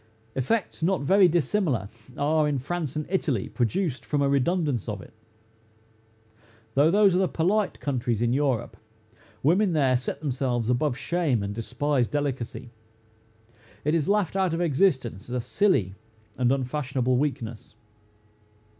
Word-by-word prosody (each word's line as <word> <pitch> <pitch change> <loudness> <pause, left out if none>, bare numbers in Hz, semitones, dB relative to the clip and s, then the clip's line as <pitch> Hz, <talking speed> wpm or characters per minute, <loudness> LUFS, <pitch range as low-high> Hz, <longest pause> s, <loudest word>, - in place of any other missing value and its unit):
Effects 165 - -1
not 180 +1 +1
very 190 +5 +5
dissimilar, 160 - 0 0.3
are, 155 +1 +2
in 145 -2 0
France 150 +1 -3
and 155 0 -2
Italy, 155 - -1
produced 140 - -1
from 145 - -1
a - - +2
redundance 140 - 0
of 105 -2 -4
it. - - -13 1.6
Though 145 +5 +4
those 200 +1 +5
are 180 - +2
the 190 - +2
polite 190 +6 0
countries 120 -5 -1
in 120 +1 +1
Europe, 130 -5 0 0.7
women 180 +6 +3
there 135 -5 +3
set 130 +2 -5
themselves 125 -5 -1
above 125 +1 0
shame, 155 - 0
and 100 0 -3
despise 125 +3 0
delicacy. 130 -5 -3 1.1
It 150 - +2
is 165 -1 +1
laughed 200 -4 +1
out 190 -4 +1
of 170 - -2
existence, 130 - +1
as 125 - -3
a - - 0
silly 125 - +1 0.4
and 125 -1 +2
unfashionable 130 -1 0
weakness. 120 -5 -3
140 Hz, 140 wpm, -26 LUFS, 125-170 Hz, 1.6 s, very